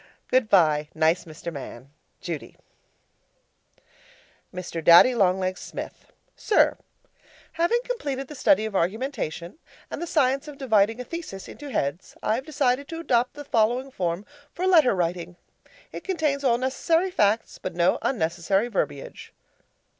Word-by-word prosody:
Goodbye, 170 -12 +3
nice 160 +3 +2
Mr. 165 +1 -8
Man, 135 -2 -9 0.3
Judy 165 -5 -6 1.9
Mr. 175 -2 -6
Daddy 170 +10 +8
Long 190 -5 +3
Legs 185 -1 -2
Smith, - - -8 0.2
SIR: 430 - +3 0.8
Having 345 +9 +1
completed 280 - -3
the 300 - -9
study 265 -3 +3
of 215 -2 -5
argumentation 190 - -2 0.3
and - - -5
the 345 - -3
science 275 -2 +1
of 295 -2 -9
dividing 225 -4 +2
a - - -3
thesis 285 - -7
into 290 -1 -9
heads, 150 - -3
I - - +1
have 260 +6 -3
decided 280 -2 0
to 330 - -6
adopt 250 -6 +1
the 290 0 -8
following 245 +2 +1
form 180 -1 -2 0.3
for 365 - -3
letter 320 - +5
writing. 175 0 -2 0.6
It - - -8
contains 310 -7 -1
all 240 -3 +3
necessary 325 +8 0
facts, 215 - +1
but 185 - -5
no 175 0 +2
unnecessary 195 +1 0
verbiage. 145 - -4
230 Hz, 140 wpm, -25 LUFS, 175-280 Hz, 1.9 s, Daddy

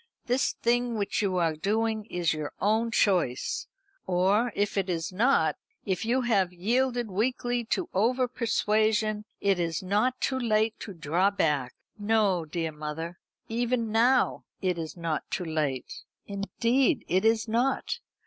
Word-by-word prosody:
"This 255 +1 +1
thing 240 0 0
which 205 +1 -1
you 190 -3 0
are 165 -3 +1
doing 220 +5 0
is 175 -5 0
your 155 -1 -5
own 220 +3 +2
choice. 195 - +1 0.4
Or, 195 +6 +2
if 205 0 0
it 195 -2 0
is 165 0 -2
not 245 +8 +3 0.3
if 190 0 -1
you 250 +3 +2
have 200 -7 +2
yielded 240 +5 0
weakly 245 +3 0
to 335 +9 -1
over 250 +5 +2
persuasion 215 -2 +1
it 195 -2 +2
is 165 0 -1
not 210 +7 +1
too 260 -1 0
late 220 -2 +2
to 200 - -8
draw 170 +5 +2
back. 150 -10 0 0.2
No, 205 -5 +2
dear 160 +1 -3
mother, 155 +3 -6 0.3
even 235 0 -1
now 245 +3 +3 0.2
it 180 -3 -1
is 160 +1 -6
not 165 -2 -3
too 180 - -2
late. 150 -5 -2 0.2
Indeed, 230 +6 +1
it 185 +3 +2
is 225 +1 +2
not. 250 - 0
210 Hz, 150 wpm, -28 LUFS, 175-235 Hz, 0.4 s, not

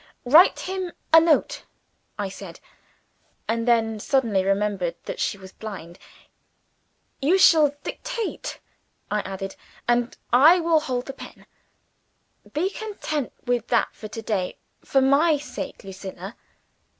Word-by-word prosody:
"Write 310 +9 +6
him 375 -2 -4 0.2
a 325 - +10
note," 330 - +2 0.5
I 205 -1 -2
said 190 -2 -10 0.9
and 230 +1 -1
then 225 -2 +2
suddenly 225 -6 +1
remembered 195 -3 0
that - - -6
she - - -1
was 190 -1 -12
blind. 190 -6 -9 1.2
"You 320 +8 +4
shall 310 -6 +6
dictate," - - -5 0.5
I 210 - +1
added; 195 0 -6 0.3
"and 240 0 +1 0.2
I 310 +9 +7
will 330 -1 +3
hold 250 -4 -3
the 270 - -6
pen. - - -12 1.1
Be 360 +6 0
content 395 - -4
with 245 -2 0
that 235 - +2
for 215 - -9
to 225 +2 -7
day. 195 -4 -2 0.3
For 270 - +2
my 290 +4 +4
sake, 290 +1 -7
Lucilla!" 195 +1 -8
245 Hz, 125 wpm, -24 LUFS, 200-310 Hz, 1.2 s, a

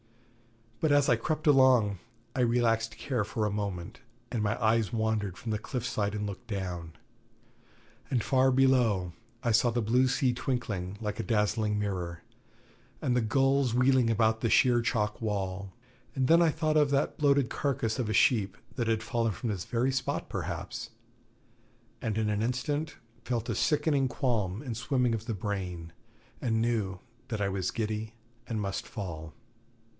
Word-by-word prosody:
But 155 - +2
as 145 -1 +4
I 120 - +6
crept 155 +7 -2
along, 130 - +5 0.4
I - - -2
relaxed 115 -2 +2
care 125 -6 -1
for 110 +1 -2
a 105 - 0
moment, 100 +1 -4 0.3
and 115 - -1
my 100 -1 0
eyes 110 -1 +2
wandered 110 -5 -1
from 115 - -5
the 105 - -1
cliff 125 +2 -4
side 105 -3 -1
and 105 0 -2
looked 100 -2 -7
down. 90 -6 -4 1.2
And 120 -5 +1
far 130 0 +3
below 125 -9 +3 0.3
I 120 - +2
saw 115 +2 +4
the 120 0 0
blue 125 +4 +3
sea 130 -1 +2
twinkling 105 -7 -3
like 105 -2 -4
a - - 0
dazzling 105 -1 +1
mirror, 90 -5 -3 0.8
and 125 -2 0
the 125 - +3
gulls 135 +2 +2
wheeling 125 -1 +4
about 110 0 +2
the 115 - +1
sheer 120 0 +4
chalk 105 -2 -1
wall, 100 -3 -2 0.4
and 130 -1 +1
then 165 +3 +6
I 170 - +5
thought 155 0 +1
of 150 -2 +4
that 140 +1 0
bloated 140 -4 +3
carcass 130 -4 -1
of 115 -4 -1
a - - 0
sheep 105 -4 +3 0.2
that 120 -3 0
had 110 -1 +1
fallen 115 -1 0
from 115 +6 -4
this 95 -4 -3
very 125 +2 +1
spot 135 0 -2
perhaps, - - -4 1.1
and 110 -2 -2
in 110 -1 +1
an 105 0 0
instant 135 +6 -1 0.3
felt 120 -1 -2
a - - +1
sickening 145 +2 +2
qualm 115 -5 -1
and 125 -5 -4
swimming 125 +1 +1
of 110 0 -4
the 115 - -1
brain, 90 -4 -4 0.5
and 110 -2 +1
knew 110 -5 0 0.3
that 110 -5 -3
I 100 -1 +1
was 95 -2 -1
giddy 110 0 -3 0.3
and 110 -2 -2
must 100 -2 -3
fall. 85 -7 -6
115 Hz, 170 wpm, -29 LUFS, 105-125 Hz, 1.2 s, I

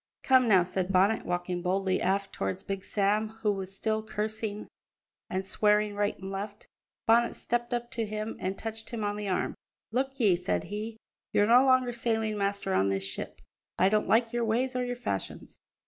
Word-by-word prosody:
"Come 260 -2 +5
now," 190 -5 +6
said 185 +1 -2
Bonnet, 195 +4 +3
walking 175 0 -2
boldly 190 +1 0
aft 195 +2 0
towards 95 -1 -3
Big 195 -1 -4
Sam, 210 +1 +1
who 210 - +4
was 195 -1 -5
still 220 +2 0
cursing 215 0 -4 0.6
and 190 +1 -2
swearing 210 +1 +2
right 205 0 0
and 190 0 -7
left. 205 +2 -6 0.4
Bonnet 235 +1 +4
stepped 240 0 -2
up 240 0 -2
to 225 -2 -2
him 215 +1 -4
and 190 +1 -2
touched 225 0 -5
him 230 -3 -4
on 205 0 -1
the 205 -1 -3
arm. 185 - 0 0.4
"Look 265 +3 -1
ye," 205 -7 +5
said 90 - -1
he, 215 +2 -5 0.4
"you're 205 - +4
no 240 +4 +7
longer 255 -2 +3
sailing 225 -2 0
master 200 - -1
on 95 +1 +3
this 95 0 -1
ship; 95 - -6 0.4
I 185 - +5
don't 215 +1 +1
like 230 +1 +3
your 240 0 0
ways 245 +4 0
or 250 - +1
your 245 0 -2
fashions. 100 - -5
210 Hz, 190 wpm, -29 LUFS, 190-230 Hz, 0.6 s, no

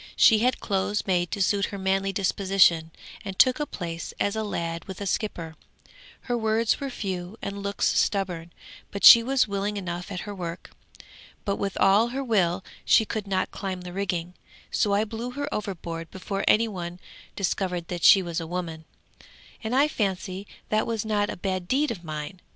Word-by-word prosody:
'She 220 -2 +6
had 250 +2 +1
clothes 200 +1 -1
made 175 -2 +1
to - - -4
suit 200 +1 +2
her 200 - -6
manly 195 0 0
disposition, 190 -4 +3 0.3
and 195 -2 -6
took 255 +2 +5
a 295 - -1
place 170 -2 -6
as 205 +1 +1
a 220 - -1
lad 170 -5 -3
with 190 -2 -8
a 200 - -4
skipper. 170 -5 -3 0.7
Her 245 - -2
words 220 0 +1
were 275 - -3
few 190 -4 -5
and 200 0 -5
looks 200 0 -1
stubborn, 180 -4 0 0.4
but 200 - -1
she 235 - +12
was 260 0 +2
willing 200 +1 -2
enough 180 0 -5
at 180 -2 -4
her 205 - -6
work. 175 -3 -6 0.7
But 200 -2 0
with 200 -1 -3
all 200 +4 +5
her 265 +3 -3
will 190 -6 +1 0.2
she 220 - +5
could 215 -2 -4
not 190 -1 0
climb 190 -2 -4
the 180 0 -8
rigging; 180 -3 -2 0.4
so 205 - +1
I 205 - +3
blew 230 +3 -5
her 285 +2 -3
overboard 170 -5 -4
before 195 +2 -4
any 225 +2 +5
one 175 -4 -6 0.4
discovered 180 -3 -1
that 175 -1 -4
she 195 -2 +8
was 170 -1 -3
a 165 - -5
woman, 165 -2 -5 0.8
and 225 +3 -1
I 280 +3 +5
fancy 195 -5 -3 0.2
that 215 0 +1
was 225 -2 -2
not 205 -1 +1
a - - -5
bad 185 -1 -3
deed 280 +4 +1
of 185 -6 -6
mine!' 155 +3 -6
195 Hz, 185 wpm, -26 LUFS, 180-215 Hz, 0.8 s, she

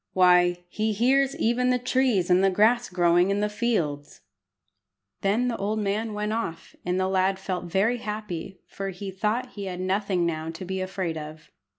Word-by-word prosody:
Why, 180 -1 +4
he 215 +4 -1
hears 265 +5 +2
even 245 +2 +1
the 250 - +3
trees 250 -7 +1
and 180 +2 +5
the 195 - +5
grass 225 +5 +3
growing 175 0 +3
in 200 +1 +1
the 210 - +1
fields!" 175 -11 -2 1.0
Then 215 +6 +1
the 235 - -1
old 210 +2 -1
man 210 +1 -1
went 210 +1 -2
off, 165 -8 -4
and 180 +1 -1
the 185 - +1
lad 190 0 +1
felt 185 -2 -4
very 195 +7 +1
happy, 210 -4 -6
for 195 0 -5
he 195 +1 -6
thought 220 +6 -1
he 200 -2 -6
had 180 -1 -5
nothing 185 -1 0
now 160 -1 -2
to 165 +3 -7
be 190 +1 -3
afraid 185 -4 -3
of. 155 +1 -10
195 Hz, 185 wpm, -26 LUFS, 180-220 Hz, 1.0 s, and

